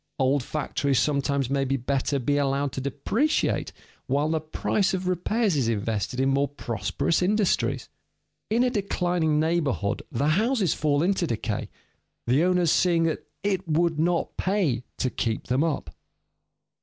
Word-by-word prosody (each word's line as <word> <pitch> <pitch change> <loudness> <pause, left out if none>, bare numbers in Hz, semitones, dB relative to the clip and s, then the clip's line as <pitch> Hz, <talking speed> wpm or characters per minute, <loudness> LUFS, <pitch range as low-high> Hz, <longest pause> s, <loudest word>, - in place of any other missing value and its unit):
Old 135 +1 +2
factories 140 0 -1
sometimes 140 -1 +1
may 135 +1 0
better 135 +1 0
be 145 +2 0
allowed 140 0 0
to 130 - -4
depreciate 195 - 0 0.4
while 145 +3 +1
the 160 0 +1
price 195 +5 0
of 185 0 -3
repairs 190 +2 +1
is 130 -5 +1
invested 110 +2 -1
in 135 +1 +2
more 140 +1 +2
prosperous 120 - -1
industries. 205 +1 +1 0.6
In 230 +3 +3
a 250 - +2
declining 175 -7 0
neighborhood 155 -10 0
the 140 +5 +1
houses 210 - +2
fall 150 0 +1
into 185 -1 +1
decay, 115 - -3 0.6
the 130 +7 +3
owners 180 -2 +3
seeing 170 -2 +3
that 165 -1 -2 0.2
"it 195 -2 -1
would 165 0 +1
not 170 +1 0
pay" 185 - +1 0.2
to 130 - -1
keep 115 -2 -2
them 130 +4 +1
up. 145 - -2
150 Hz, 145 wpm, -26 LUFS, 135-180 Hz, 0.6 s, In